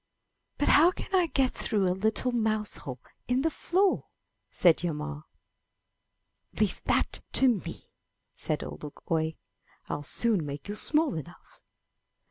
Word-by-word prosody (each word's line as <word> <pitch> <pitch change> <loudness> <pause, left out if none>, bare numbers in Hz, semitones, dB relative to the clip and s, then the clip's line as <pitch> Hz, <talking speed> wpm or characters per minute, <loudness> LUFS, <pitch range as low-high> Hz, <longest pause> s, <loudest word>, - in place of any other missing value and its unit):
'* - - -51 0.2
*'But 290 - 0
how 325 +4 +7
can 375 - -7
I 365 -3 +4
get 270 -4 +1
through 205 -2 0
a 180 - +2
little 220 +6 0
mouse 215 -3 +1
hole 130 -2 -7 0.3
in 250 +2 +1
the 325 - +1
floor!" 380 +4 +1 0.4
said 170 -3 +4
Hjalmar. 155 -2 -4 1.3
''Leave - - 0
that - - +1
to 265 - +5
me/' 230 -7 -2 0.4
said - - -3
Ole 75 +1 -7
Luk 150 - -10
oie. 160 -1 +1 0.5
'Til - - -4
soon 205 +5 +2
make 145 +2 -6
you 205 - -3
small 300 +6 +1
enough!" 165 +3 -10
210 Hz, 145 wpm, -28 LUFS, -, 1.3 s, how